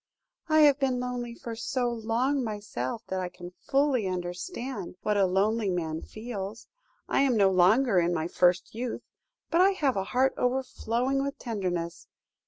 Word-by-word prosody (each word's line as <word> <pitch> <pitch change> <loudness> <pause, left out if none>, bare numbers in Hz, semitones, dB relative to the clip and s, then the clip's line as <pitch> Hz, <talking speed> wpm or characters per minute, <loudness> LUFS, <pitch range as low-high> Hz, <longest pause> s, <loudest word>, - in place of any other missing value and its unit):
"'I 310 0 +5
have 290 -2 +6
been 260 -2 +1
lonely 245 -1 -4
for 230 -1 -7
so 245 +2 -1
long 240 +4 0
myself, 210 - -4
that 190 - -1
I 180 -1 -3
can 175 0 -10
fully 270 0 +1
understand 185 - -4
what 210 - +1
a 195 -2 +4
lonely 205 +3 +1
man 160 -3 -2
feels. 215 -2 -6 0.4
I - - +2
am 265 -4 +3
no 195 -2 +5
longer 190 +4 +4
in 170 0 +2
my 160 -1 -1
first 180 +1 +2
youth, 240 +2 -4 0.5
but 335 - +4
I 390 +1 +5
have 285 -8 +1
a 195 -1 -1
heart 255 +6 +2
overflowing 255 0 0
with 280 0 -3
tenderness. 180 -7 -3
225 Hz, 165 wpm, -28 LUFS, 185-255 Hz, 0.5 s, have